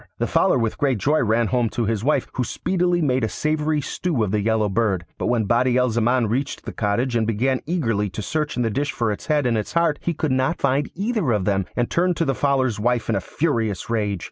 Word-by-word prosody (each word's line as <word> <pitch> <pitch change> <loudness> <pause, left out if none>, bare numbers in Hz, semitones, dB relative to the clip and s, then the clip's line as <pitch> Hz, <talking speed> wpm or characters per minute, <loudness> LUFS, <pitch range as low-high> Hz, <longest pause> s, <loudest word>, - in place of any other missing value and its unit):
The - - 0
Fowler - - +2
with 115 -3 -1
great 135 -4 +2
joy 145 +10 +2
ran 115 0 +2
home 120 -3 +1
to 120 - +1
his 110 -1 -1
wife, 140 -1 +1
who 130 - -1
speedily 175 +5 0
made 130 -3 +1
a 110 - +1
savoury 155 - 0
stew 145 -2 -1
of 100 - -1
the 105 0 +1
Yellow 110 0 +1
Bird. 100 -4 0
But - - -1
when 120 -2 +2
Badi 120 +3 +2
al 125 -1 +2
Zaman 120 +2 +2
reached 130 +6 -2
the - - -4
cottage 120 +4 0
and 110 -2 +1
began 125 +4 0
eagerly 115 - 0
to 95 +4 -6
search 150 +5 -2
in 125 - +1
the 115 - 0
dish 145 +6 -1
for 115 -3 -1
its 105 - -6
head 150 -3 +2
and 115 -3 +2
its 105 - -6
heart 170 -3 +2
he 170 - -2
could 155 -2 -1
not 130 +6 +1
find 140 +1 +1
either 205 - 0
of 105 -4 0
them, 95 -2 0
and 120 -1 +1
turned 180 0 +1
to 165 - +1
the 135 - +1
Fowler's 130 -5 +1
wife 120 +1 0
in 110 - +2
a 95 - 0
furious 115 - -2
rage. 105 -4 0
125 Hz, 245 wpm, -22 LUFS, 110-145 Hz, -, Fowler